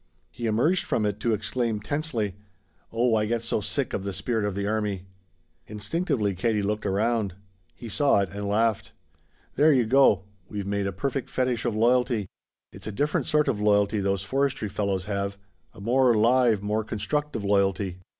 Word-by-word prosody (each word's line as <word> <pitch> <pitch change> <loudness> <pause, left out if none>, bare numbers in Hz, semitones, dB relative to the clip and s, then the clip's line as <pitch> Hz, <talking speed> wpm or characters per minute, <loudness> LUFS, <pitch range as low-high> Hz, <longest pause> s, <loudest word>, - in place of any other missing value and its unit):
He 120 - -4
emerged 130 +12 +2
from 110 - 0
it 105 0 -2
to 115 - 0
exclaim 110 +1 -1
tensely: 115 - -2 0.6
"Oh 115 +1 +2
I 105 -1 +2
get 115 +1 -1
so 115 -2 0
sick 135 +5 -2
of 95 - -2
the 100 - -3
spirit 110 +1 -1
of 100 -2 -2
the 100 0 -2
army!" 105 -3 -2 0.6
Instinctively 105 - -1
Katie 105 +3 0
looked 105 +1 -1
around. 105 -1 0 0.4
He 120 - -9
saw 140 +4 +2
it, 100 - -2
and 100 0 -4
laughed. 110 +1 0 0.6
"There 150 +3 +6
you 130 -5 +3
go! 115 -6 +4 0.3
We've 100 -2 -4
made 100 0 -1
a - - -1
perfect 135 +8 -3
fetich 125 -2 -1
of 120 -3 0
loyalty. 120 -1 +2 0.5
It's - - -11
a - - -3
different 145 +8 -1
sort 150 -1 +2
of 115 -7 0
loyalty 105 0 +3
those 100 -1 0
forestry 135 0 -1
fellows 100 -2 -2
have 100 -1 -3 0.3
a - - -15
more 120 +3 +3
live, 115 -2 +3
more 105 +1 0
constructive 110 +5 -2
loyalty. 100 -2 +1
110 Hz, 175 wpm, -26 LUFS, 100-125 Hz, 0.6 s, There